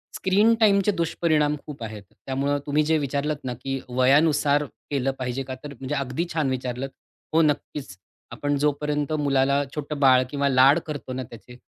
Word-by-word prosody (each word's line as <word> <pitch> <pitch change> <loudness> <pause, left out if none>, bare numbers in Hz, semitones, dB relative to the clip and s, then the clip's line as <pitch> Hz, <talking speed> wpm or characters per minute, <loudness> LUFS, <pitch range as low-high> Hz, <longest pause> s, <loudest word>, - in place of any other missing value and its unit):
Screen 205 +5 +3
टाईमचे 200 -2 +4
दुष्परिणाम 160 -4 +1
खूप 145 -6 -8
आहेत. 105 -2 -7
त्यामुळं 140 +2 -2
तुम्ही 150 +1 +2
जे 160 +1 +2
विचारलत 145 +1 -1
ना, 125 -1 -3
की 135 +2 -4
वयानुसार 145 +3 +3 0.3
केलं 135 -2 0
पाहिजे 130 +1 -3
का? 130 0 -6
तर 145 -1 -7
म्हणजे 135 +2 -3
अगदी 135 +4 -2
छान 155 -5 0
विचारलत. 130 +1 -3 0.4
हो, 165 - +5
नक्कीच. 145 - -2 0.3
आपण 145 0 -1
जोपर्यंत 150 +1 0
मुलाला 140 -1 +2
छोटं 150 -1 -4
बाळ 130 -2 +6
किंवा 140 0 0
लाड 135 +4 +6
करतो 145 -4 -5
ना 130 0 -3
त्याचे, 120 +1 -13
140 Hz, 165 wpm, -24 LUFS, 130-150 Hz, 0.4 s, बाळ